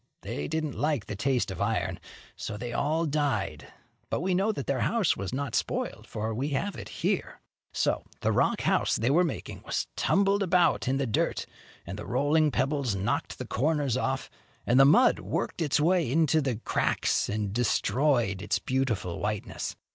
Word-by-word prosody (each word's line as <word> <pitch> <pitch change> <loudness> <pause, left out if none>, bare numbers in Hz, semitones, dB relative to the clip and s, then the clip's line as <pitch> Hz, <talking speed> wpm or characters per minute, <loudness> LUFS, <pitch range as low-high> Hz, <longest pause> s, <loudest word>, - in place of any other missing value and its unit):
They 75 - -4
didn't 155 -3 -2
like 145 -3 0
the 105 - -5
taste 125 0 0
of 95 - -6
iron, 105 +1 -1 0.4
so 105 - -5
they 120 +2 -5
all 155 +6 +1
died; 145 -2 -1 0.4
but - - -1
we 185 +1 0
know 195 +4 +2
that 140 -10 -5
their 135 -2 0
house 215 - +2
was 100 -2 -4
not 135 -2 -3
spoiled, - - -2
for 110 +1 -3
we 130 +6 -2
have 205 +5 -3
it - - -8
here. - - -2 0.3
So - - 0 0.2
the - - +2
rock - - +2
house - - +2
they 120 +4 +1
were 175 +5 +5
making 165 -6 -4
was - - -1
tumbled 200 +1 +2
about 180 -6 +3
in 135 +1 +2
the 140 - 0
dirt, 110 - 0 0.4
and 95 +4 -6
the - - -7
rolling 145 +5 +3
pebbles 135 -4 0
knocked 95 +2 -2
the - - -5
corners 145 0 0
off, 130 +1 -1 0.4
and 120 +2 +4
the 135 - +9
mud 170 - +5
worked - - -3
its 150 -2 +2
way 165 -3 +2
into 160 +1 +3
the 135 -4 -1
cracks 110 - 0
and 105 -1 -2
destroyed 120 -2 +1
its 105 - 0
beautiful 125 -10 -1
whiteness. 105 0 -3
135 Hz, 180 wpm, -28 LUFS, 110-155 Hz, 0.4 s, the